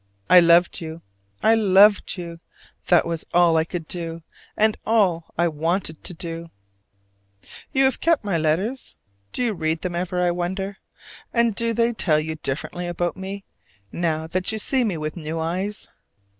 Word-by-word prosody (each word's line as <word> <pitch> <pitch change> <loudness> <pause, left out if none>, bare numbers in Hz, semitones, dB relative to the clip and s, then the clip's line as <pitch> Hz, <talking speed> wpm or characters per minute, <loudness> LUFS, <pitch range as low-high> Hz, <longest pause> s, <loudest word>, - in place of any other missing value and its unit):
I 180 - +10
loved 170 +1 +4
you, 160 0 -7 0.4
I 220 - +5
loved 205 -2 +4
you! 170 -1 -7 0.5
that 175 -2 +4
was 165 -1 -3
all 175 -2 +5
I 160 - +3
could 165 -2 -6
do, 165 -2 -5 0.3
and 215 0 +4
all 190 -7 +1
I 170 +1 +3
wanted 160 +1 -2
to 180 - -5
do. 165 0 -6 1.2
You 270 -2 +3
have 265 0 +2
kept 330 -9 +2
my 200 -4 0
letters? 170 +11 -1 0.4
Do 250 - -2
you 235 -3 +1
read 160 -2 -2
them 180 -1 -2
ever, 180 +1 -2
I 175 -1 +2
wonder? 190 +3 -3 0.5
and 235 -2 +2
do 230 +3 +1
they 235 +1 +2
tell 160 -8 +2
you 160 +1 -3
differently 160 +5 -4
about 175 0 -2
me, 195 +1 -6 0.5
now 160 -2 -1
that 185 +5 -1
you 220 - -3
see 255 +4 +1
me 200 -7 -1
with 155 0 -4
new 160 -1 -5
eyes? 185 +6 -3
175 Hz, 170 wpm, -23 LUFS, 165-205 Hz, 1.2 s, I